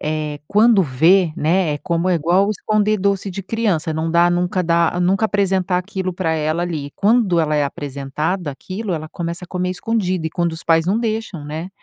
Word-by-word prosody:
eh, 150 Hz, -1 st, -3 dB
quando 210 Hz, -1 st, +4 dB
vê, 165 Hz, +5 st, +3 dB
né, 165 Hz, +1 st, +1 dB
é -, -, -5 dB
como 170 Hz, +4 st, -1 dB
é 180 Hz, -, +3 dB
igual 175 Hz, +5 st, +2 dB
esconder 215 Hz, +1 st, +1 dB
doce 200 Hz, 0 st, 0 dB
de 195 Hz, +2 st, -6 dB
criança, 190 Hz, -6 st, -1 dB
não 160 Hz, +1 st, -2 dB
dá 170 Hz, +1 st, +4 dB
nunca 180 Hz, +2 st, 0 dB
dá 170 Hz, +1 st, +1 dB
nunca 190 Hz, +4 st, +2 dB
apresentar 190 Hz, -3 st, 0 dB
aquilo 185 Hz, 0 st, -3 dB
para 170 Hz, -3 st, -1 dB
ela 155 Hz, +2 st, -1 dB
ali, 155 Hz, -5 st, -4 dB
quando 205 Hz, -4 st, +2 dB
ela 155 Hz, -1 st, 0 dB
é 145 Hz, -, +2 dB
apresentada 145 Hz, +5 st, -3 dB
àquilo, 190 Hz, +8 st, -5 dB
ela 155 Hz, 0 st, -5 dB
começa 170 Hz, +2 st, -5 dB
a -, -, -16 dB
comer 180 Hz, 0 st, -2 dB
escondido 185 Hz, -4 st, -1 dB
e -, -, -4 dB
quando 170 Hz, 0 st, -1 dB
os 160 Hz, +1 st, -7 dB
pais 165 Hz, 0 st, +2 dB
não 205 Hz, +5 st, +2 dB
deixam, 220 Hz, -8 st, -3 dB
né. 160 Hz, +4 st, -5 dB
175 Hz, 200 wpm, -19 LUFS, 160-195 Hz, -, quando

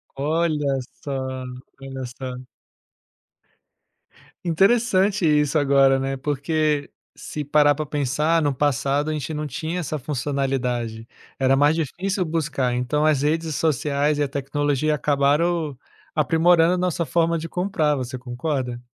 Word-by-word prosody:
Olha 150 Hz, -1 st, 0 dB, 0.3 s
só, 140 Hz, -, -5 dB, 0.7 s
olha 135 Hz, -1 st, -6 dB
só. 130 Hz, -1 st, -6 dB, 2.0 s
Interessante 195 Hz, +2 st, +2 dB
isso 150 Hz, -1 st, +3 dB
agora, 135 Hz, -1 st, +4 dB
né, 135 Hz, 0 st, -2 dB
porque, 150 Hz, +1 st, -1 dB, 0.2 s
se 150 Hz, -, -6 dB
parar 145 Hz, 0 st, +4 dB
para 155 Hz, 0 st, -3 dB
pensar, 150 Hz, +4 st, +1 dB
no 145 Hz, -1 st, +1 dB
passado, 145 Hz, +2 st, 0 dB
a -, -, -1 dB
gente 150 Hz, +1 st, -4 dB
não 150 Hz, 0 st, -3 dB
tinha 160 Hz, +6 st, -4 dB
essa 155 Hz, -2 st, -3 dB
funcionalidade. 125 Hz, -4 st, -2 dB, 0.3 s
Era 135 Hz, 0 st, +3 dB
mais 145 Hz, +3 st, +4 dB
difícil 180 Hz, +5 st, -2 dB
buscar, 145 Hz, -6 st, -1 dB
então 125 Hz, +5 st, 0 dB
as 150 Hz, -3 st, +3 dB
redes 160 Hz, +1 st, 0 dB
sociais 145 Hz, -1 st, +1 dB
e 145 Hz, -, +1 dB
a -, -, 0 dB
tecnologia 145 Hz, +1 st, 0 dB
acabaram 150 Hz, +2 st, +1 dB, 0.4 s
aprimorando 165 Hz, +3 st, +4 dB
a -, -, 0 dB
nossa 175 Hz, -2 st, -1 dB
forma 170 Hz, 0 st, +1 dB
de 165 Hz, +1 st, -5 dB
comprar, 165 Hz, -5 st, 0 dB
você 130 Hz, -1 st, -4 dB
concorda? 125 Hz, 0 st, -3 dB
150 Hz, 130 wpm, -23 LUFS, 135-160 Hz, 2.0 s, agora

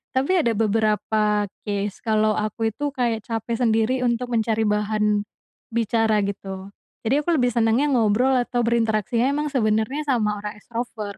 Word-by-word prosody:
Tapi 270 Hz, +7 st, +1 dB
ada 235 Hz, -6 st, 0 dB
beberapa 215 Hz, -1 st, +1 dB, 0.2 s
case 205 Hz, 0 st, -2 dB
kalau 215 Hz, -1 st, +2 dB
aku 215 Hz, +1 st, -1 dB
itu 290 Hz, +3 st, -2 dB
kayak 240 Hz, -5 st, -1 dB
capek 225 Hz, +1 st, -3 dB
sendiri 225 Hz, +1 st, +2 dB
untuk 245 Hz, 0 st, -1 dB
mencari 225 Hz, -1 st, +1 dB
bahan 210 Hz, 0 st, +1 dB, 0.5 s
bicara 225 Hz, -2 st, +1 dB
gitu. 195 Hz, -1 st, -6 dB, 0.3 s
Jadi 270 Hz, +6 st, +2 dB
aku 330 Hz, +1 st, +1 dB
lebih 245 Hz, -2 st, +1 dB
senangnya 235 Hz, +5 st, +2 dB
ngobrol 240 Hz, +2 st, +3 dB
atau 245 Hz, -1 st, 0 dB
berinteraksi 230 Hz, -1 st, +1 dB
emang 285 Hz, +4 st, +1 dB
sebenernya 220 Hz, +4 st, +1 dB
sama 210 Hz, -5 st, +1 dB
orang 210 Hz, 0 st, -6 dB
extrovert. 230 Hz, 0 st, -5 dB
225 Hz, 145 wpm, -23 LUFS, 210-245 Hz, 0.5 s, ngobrol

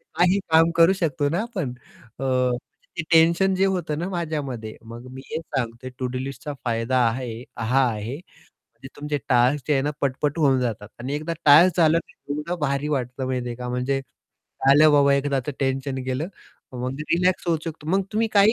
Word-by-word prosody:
काही 180 Hz, +3 st, +3 dB
काम 165 Hz, +1 st, +5 dB
करू 170 Hz, +3 st, +6 dB
शकतो 160 Hz, -5 st, 0 dB
ना 170 Hz, +5 st, 0 dB
आपण 190 Hz, -, -4 dB, 0.5 s
अ, -, -, -4 dB, 0.7 s
ते -, -, 0 dB
टेन्शन 170 Hz, +4 st, +4 dB
जे 190 Hz, +1 st, +3 dB
होतं 175 Hz, -6 st, -1 dB
ना 175 Hz, -, -2 dB
माझ्यामध्ये, 145 Hz, -, -4 dB
मग 115 Hz, +2 st, -10 dB
मी 130 Hz, +1 st, -9 dB
हेच 160 Hz, -, -3 dB
सांगतो 120 Hz, 0 st, -3 dB
टू-डू 130 Hz, 0 st, -2 dB
लिस्टचा 135 Hz, +2 st, -5 dB
फायदा 115 Hz, +2 st, 0 dB
आहे 120 Hz, 0 st, -4 dB, 0.2 s
हा 125 Hz, +4 st, +2 dB
आहे 110 Hz, +5 st, -5 dB, 0.7 s
की 135 Hz, -, -8 dB
तुमचे 145 Hz, 0 st, -3 dB
टास्क 125 Hz, +3 st, +3 dB
जे 150 Hz, -, +1 dB
आहे 135 Hz, -2 st, +2 dB
ना 145 Hz, -, 0 dB
पट-पट 145 Hz, +3 st, -1 dB
होऊन 135 Hz, -4 st, +3 dB
जातात 110 Hz, -4 st, -3 dB
आणि 130 Hz, +4 st, -3 dB
एकदा 155 Hz, +3 st, -3 dB
टास्क 165 Hz, +6 st, +7 dB
झालं 165 Hz, 0 st, +5 dB
की -, -, -20 dB, 0.2 s
एवढं 150 Hz, +4 st, -3 dB
भारी 140 Hz, +1 st, 0 dB
वाटतं 125 Hz, +1 st, -4 dB
माहिती 125 Hz, -1 st, -2 dB
आहे 120 Hz, -, -5 dB
का 125 Hz, 0 st, -6 dB
म्हणजे 125 Hz, +2 st, -1 dB, 0.7 s
आलं 150 Hz, +2 st, +7 dB
बाबा 140 Hz, -1 st, +5 dB
एकदाचं 140 Hz, 0 st, -1 dB
टेन्शन 135 Hz, 0 st, -1 dB
गेलं. 130 Hz, +7 st, -2 dB, 0.4 s
मग 130 Hz, +3 st, -4 dB
रिलॅक्स 180 Hz, +4 st, +1 dB
होऊ 170 Hz, -1 st, +2 dB
शकतो 160 Hz, -2 st, -7 dB
मग 195 Hz, +2 st, +2 dB
तुम्ही 225 Hz, +1 st, +1 dB
काही 200 Hz, +2 st, +6 dB
145 Hz, 180 wpm, -24 LUFS, 130-165 Hz, 0.7 s, टास्क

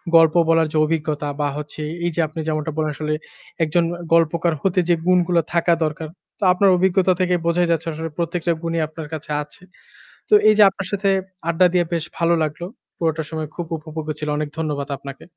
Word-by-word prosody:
গল্প 165 Hz, -1 st, +6 dB
বলার 165 Hz, -1 st, +4 dB
যে -, -, +1 dB
অভিজ্ঞতা 150 Hz, -2 st, -2 dB
বা 145 Hz, -, +1 dB
হচ্ছে 150 Hz, +1 st, -7 dB, 0.2 s
এই 175 Hz, -, 0 dB
যে -, -, -3 dB
আপনি 160 Hz, +2 st, -8 dB
যেমনটা 155 Hz, 0 st, -1 dB
বলেন, 155 Hz, -1 st, 0 dB
আসলে 155 Hz, 0 st, -2 dB, 0.5 s
একজন 165 Hz, +2 st, +2 dB, 0.3 s
গল্পকার 165 Hz, +1 st, +3 dB
হতে 185 Hz, -1 st, +1 dB
যে 170 Hz, -, +5 dB
গুণগুলো 180 Hz, -2 st, +3 dB
থাকা 170 Hz, 0 st, +3 dB
দরকার, 155 Hz, +1 st, -4 dB, 0.3 s
তো -, -, -4 dB
আপনার 195 Hz, +2 st, +4 dB
অভিজ্ঞতা 185 Hz, 0 st, +3 dB
থেকে 180 Hz, 0 st, +2 dB
বোঝাই 175 Hz, +1 st, +2 dB
যাচ্ছে 165 Hz, 0 st, 0 dB
আসলে 160 Hz, +1 st, -5 dB
প্রত্যেকটা 170 Hz, 0 st, -1 dB
গুণই 165 Hz, 0 st, -2 dB
আপনার 155 Hz, -1 st, -8 dB
কাছে 155 Hz, -1 st, -6 dB
আছে। 150 Hz, -, -15 dB, 0.7 s
তো 425 Hz, -, +5 dB
এই 215 Hz, -, +6 dB
যে 210 Hz, -, +8 dB
আপনার 195 Hz, 0 st, -6 dB
সাথে 200 Hz, 0 st, 0 dB, 0.4 s
আড্ডা 170 Hz, +2 st, +4 dB
দিয়ে 180 Hz, -1 st, +3 dB
বেশ 165 Hz, -2 st, 0 dB
ভালো 170 Hz, 0 st, +3 dB
লাগলো। 155 Hz, +3 st, -5 dB, 0.3 s
পুরোটা 160 Hz, -1 st, 0 dB
সময় 155 Hz, -2 st, -4 dB
খুব 175 Hz, -2 st, -5 dB
উপভোগ্য 155 Hz, 0 st, -7 dB
ছিল। 150 Hz, -, -4 dB
অনেক 150 Hz, -1 st, -2 dB
ধন্যবাদ 145 Hz, -3 st, -2 dB
আপনাকে। 140 Hz, 0 st, -10 dB
165 Hz, 190 wpm, -21 LUFS, 155-175 Hz, 0.7 s, যে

